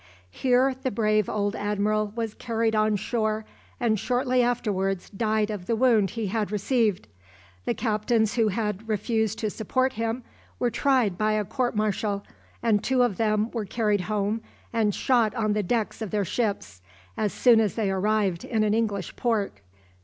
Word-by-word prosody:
Here 255 Hz, -, +2 dB
the 260 Hz, +1 st, -3 dB
brave 215 Hz, -2 st, +1 dB
old 205 Hz, 0 st, -1 dB
admiral 210 Hz, +1 st, 0 dB
was 225 Hz, -2 st, -2 dB
carried 225 Hz, -2 st, -1 dB
on 215 Hz, 0 st, +3 dB
shore, 215 Hz, +1 st, -1 dB, 0.3 s
and 225 Hz, -4 st, +1 dB
shortly 250 Hz, +2 st, +1 dB
afterwards 195 Hz, -6 st, -1 dB
died 215 Hz, +1 st, 0 dB
of 190 Hz, -4 st, -6 dB
the 230 Hz, -, +1 dB
wound 225 Hz, -5 st, +3 dB
he 225 Hz, -, -1 dB
had 210 Hz, 0 st, -1 dB
received. 210 Hz, -, +1 dB, 0.6 s
The -, -, 0 dB
captains 220 Hz, 0 st, +1 dB
who 225 Hz, -2 st, +2 dB
had 210 Hz, +1 st, -2 dB
refused 220 Hz, 0 st, 0 dB
to 215 Hz, -2 st, -2 dB
support 255 Hz, +5 st, 0 dB
him 230 Hz, +2 st, -2 dB, 0.3 s
were 245 Hz, -, 0 dB
tried 250 Hz, -11 st, +2 dB
by 215 Hz, 0 st, +2 dB
a 210 Hz, -1 st, 0 dB
court 245 Hz, +2 st, -1 dB
martial, 205 Hz, -1 st, -1 dB, 0.4 s
and 215 Hz, -3 st, +2 dB
two 260 Hz, -1 st, +3 dB
of 225 Hz, -7 st, 0 dB
them 215 Hz, 0 st, +1 dB
were 225 Hz, -3 st, -3 dB
carried 210 Hz, -1 st, 0 dB
home 210 Hz, +3 st, -1 dB, 0.3 s
and 215 Hz, -3 st, +1 dB
shot 240 Hz, -4 st, +2 dB
on 215 Hz, -3 st, +1 dB
the 210 Hz, -, +1 dB
decks 220 Hz, +3 st, -1 dB
of 220 Hz, -, -3 dB
their 205 Hz, 0 st, 0 dB
ships, 185 Hz, -, -2 dB, 0.3 s
as 210 Hz, -, 0 dB
soon 240 Hz, -3 st, +5 dB
as 205 Hz, -5 st, 0 dB
they 210 Hz, -4 st, 0 dB
arrived 195 Hz, -2 st, +1 dB
in 220 Hz, -3 st, 0 dB
an 210 Hz, -1 st, +2 dB
English 210 Hz, -5 st, -1 dB
port. 215 Hz, -, -1 dB
215 Hz, 170 wpm, -26 LUFS, 205-230 Hz, 0.6 s, soon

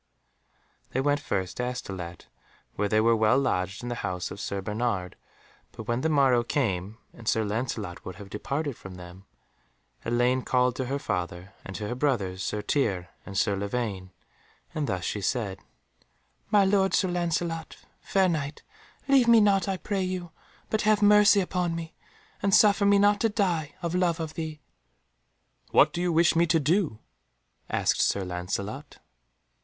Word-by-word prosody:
They 130 Hz, -, 0 dB
went 145 Hz, +2 st, +2 dB
first 95 Hz, -, -3 dB
to 125 Hz, -, -1 dB
Astolat, 95 Hz, -9 st, -6 dB, 0.5 s
where 105 Hz, -, -1 dB
they 110 Hz, -, +3 dB
were 115 Hz, +1 st, +4 dB
well 110 Hz, +3 st, +3 dB
lodged 100 Hz, -6 st, -1 dB
in 120 Hz, -, -4 dB
the -, -, -1 dB
house 90 Hz, -3 st, -3 dB
of 100 Hz, -, -7 dB
Sir 100 Hz, -1 st, -3 dB
Bernard, 105 Hz, -2 st, -2 dB, 0.6 s
but -, -, -8 dB
when 120 Hz, +3 st, -1 dB
the 160 Hz, -, +1 dB
morrow 135 Hz, -5 st, +4 dB
came, 105 Hz, -6 st, -1 dB, 0.2 s
and 115 Hz, -, -13 dB
Sir 110 Hz, -, +2 dB
Lancelot 105 Hz, -4 st, -3 dB
would 95 Hz, -, -7 dB
have 100 Hz, 0 st, -11 dB
departed 140 Hz, +5 st, -3 dB
from 95 Hz, -3 st, -10 dB
them, 90 Hz, +2 st, -12 dB, 0.8 s
Elaine 120 Hz, +2 st, +2 dB
called 125 Hz, -1 st, +1 dB
to 130 Hz, -, -2 dB
her 135 Hz, +3 st, -2 dB
father 90 Hz, -5 st, -4 dB
and 95 Hz, -, -8 dB
to 105 Hz, -, -4 dB
her 120 Hz, -, -2 dB
brothers 115 Hz, -9 st, -1 dB
Sir 105 Hz, +1 st, -3 dB
Tirre 100 Hz, -11 st, 0 dB, 0.2 s
and 100 Hz, -1 st, -5 dB
Sir 100 Hz, 0 st, +2 dB
Lavaine, 100 Hz, -2 st, -3 dB, 0.6 s
and 150 Hz, -2 st, -2 dB
thus 90 Hz, -2 st, -2 dB
she 105 Hz, -, -2 dB
said— 100 Hz, -2 st, -1 dB, 0.9 s
"My 205 Hz, -2 st, +5 dB
lord 190 Hz, 0 st, +3 dB
Sir 190 Hz, -, +2 dB
Lancelot, 170 Hz, -2 st, -2 dB, 0.2 s
fair 190 Hz, -1 st, +2 dB
Knight, 155 Hz, -4 st, -3 dB, 0.4 s
leave 270 Hz, -3 st, +5 dB
me 235 Hz, -1 st, +7 dB
not, 200 Hz, -3 st, +3 dB
I 195 Hz, -1 st, -1 dB
pray 200 Hz, +1 st, -2 dB
you, 185 Hz, -2 st, -3 dB, 0.4 s
but 220 Hz, -, +1 dB
have 215 Hz, -1 st, +3 dB
mercy 210 Hz, 0 st, +6 dB
upon 180 Hz, -2 st, -1 dB
me, 165 Hz, -1 st, -6 dB, 0.5 s
and 200 Hz, -1 st, +4 dB
suffer 205 Hz, -1 st, +5 dB
me 200 Hz, 0 st, +5 dB
not 205 Hz, 0 st, +4 dB
to 225 Hz, -, +3 dB
die 175 Hz, -8 st, -1 dB
of 170 Hz, 0 st, -2 dB
love 180 Hz, -2 st, +1 dB
of 160 Hz, -1 st, -4 dB
thee." 155 Hz, -2 st, -5 dB, 1.1 s
"What -, -, +5 dB
do 175 Hz, -, -2 dB
you 180 Hz, -1 st, +1 dB
wish 165 Hz, +1 st, +4 dB
me 170 Hz, +1 st, +4 dB
to 165 Hz, 0 st, +3 dB
do?" 155 Hz, -, +1 dB, 0.7 s
asked -, -, +1 dB
Sir 100 Hz, -2 st, +1 dB
Lancelot. 90 Hz, +3 st, -5 dB
130 Hz, 170 wpm, -27 LUFS, -, 1.1 s, me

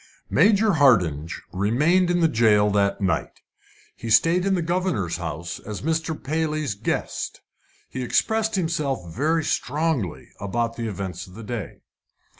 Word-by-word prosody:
Major 210 Hz, +1 st, +4 dB
Hardinge 90 Hz, -, +3 dB
remained 150 Hz, -, +2 dB
in 175 Hz, 0 st, +2 dB
the 165 Hz, -, +5 dB
jail 110 Hz, -6 st, +3 dB
that 100 Hz, 0 st, +1 dB
night. 95 Hz, -1 st, -1 dB, 0.5 s
He 115 Hz, -, -7 dB
stayed 170 Hz, -, +4 dB
in 195 Hz, -, +2 dB
the 175 Hz, -, -1 dB
governor's 165 Hz, -, -1 dB
house 85 Hz, 0 st, -5 dB
as 105 Hz, +1 st, -7 dB
Mr. 160 Hz, 0 st, -1 dB
Paley's 155 Hz, -3 st, -1 dB
guest. 100 Hz, +2 st, -3 dB, 0.5 s
He 130 Hz, -, -6 dB
expressed 220 Hz, -, +1 dB
himself 145 Hz, -, -2 dB
very 160 Hz, +6 st, +1 dB
strongly 145 Hz, -, -1 dB
about 115 Hz, +3 st, -2 dB
the 115 Hz, -1 st, -3 dB
events 95 Hz, -3 st, -5 dB
of 90 Hz, -, -15 dB
the 115 Hz, -, -9 dB
day. 115 Hz, -1 st, -6 dB
125 Hz, 140 wpm, -24 LUFS, 100-165 Hz, 0.5 s, the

